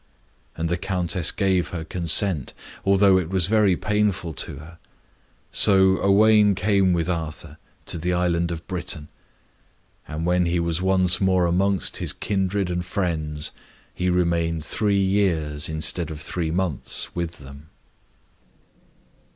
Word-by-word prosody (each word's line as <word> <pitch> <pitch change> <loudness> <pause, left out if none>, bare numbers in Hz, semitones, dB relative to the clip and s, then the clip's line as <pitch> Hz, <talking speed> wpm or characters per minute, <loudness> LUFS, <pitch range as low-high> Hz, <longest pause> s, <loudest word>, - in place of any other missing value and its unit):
And 80 - -2
the 85 +1 -2
Countess 90 -3 -1
gave 95 -3 0
her 85 -2 -6
consent, 85 -1 +1 0.3
although 100 -1 +4
it 85 -3 -4
was 95 -2 +1
very 105 -2 +3
painful 105 -5 -1
to - - -4
her. 80 +4 -13 0.7
So 95 -2 +4
Owain 105 0 +4
came 100 -1 +2
with 85 -1 0
Arthur 80 -4 -5 0.3
to 85 - -1
the 90 +3 -1
island 85 -1 0
of 85 -1 -6
Britain. 85 -5 -3 1.0
And 80 +2 -4
when 90 0 +1
he 85 0 0
was 85 0 -1
once 95 -1 +3
more 95 -2 +2
amongst 95 +1 0
his - - -2
kindred 95 -2 -2
and 90 0 -2
friends, 80 -5 -3 0.4
he 90 0 -1
remained 85 -3 0
three 100 +4 0
years, 85 -6 0
instead 80 +1 -1
of 80 -1 -7
three 80 +1 -3
months, 85 -4 -2
with 85 -1 -4
them. 70 +2 -13
90 Hz, 135 wpm, -23 LUFS, 80-95 Hz, 1.0 s, although